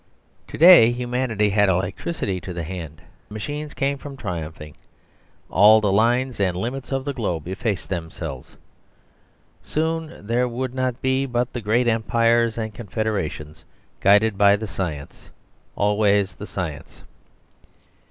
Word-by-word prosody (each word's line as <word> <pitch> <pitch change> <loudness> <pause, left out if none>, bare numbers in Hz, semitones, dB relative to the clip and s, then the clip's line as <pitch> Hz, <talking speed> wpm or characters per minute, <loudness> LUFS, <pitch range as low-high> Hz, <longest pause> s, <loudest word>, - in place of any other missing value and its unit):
To - - -8
day 165 -9 +8
humanity 120 -3 -1
had 105 0 +3
electricity 95 - -2
to 90 - -7
the 85 -1 -4
hand; 80 -3 -8 0.2
the - - -13
machines 145 +7 -5
came 140 0 -1
from 140 -1 -9
triumphing; 80 - -6 0.7
all 105 +3 +6
the 105 -2 +1
lines 120 +4 +1
and 95 -3 0
limits 125 +8 -4
of 135 0 -2
the 140 - -2
globe 90 - -3
effaced 100 +1 -3
themselves. 80 -7 -6 1.1
Soon 160 -6 -3
there 120 +3 +1
would 125 +1 -4
not 130 -2 -2
be 130 +1 +1
but 120 0 -1
the 120 - -4
great 115 +4 +1
Empires 115 0 +2
and 110 -1 -4
confederations, 100 -8 -4 0.4
guided 105 +1 +4
by 100 0 +6
the 110 +2 -5
science, 85 -8 -6 0.5
always 100 -2 +2
the - - -9
science. - - -6
110 Hz, 135 wpm, -22 LUFS, 95-125 Hz, 1.1 s, day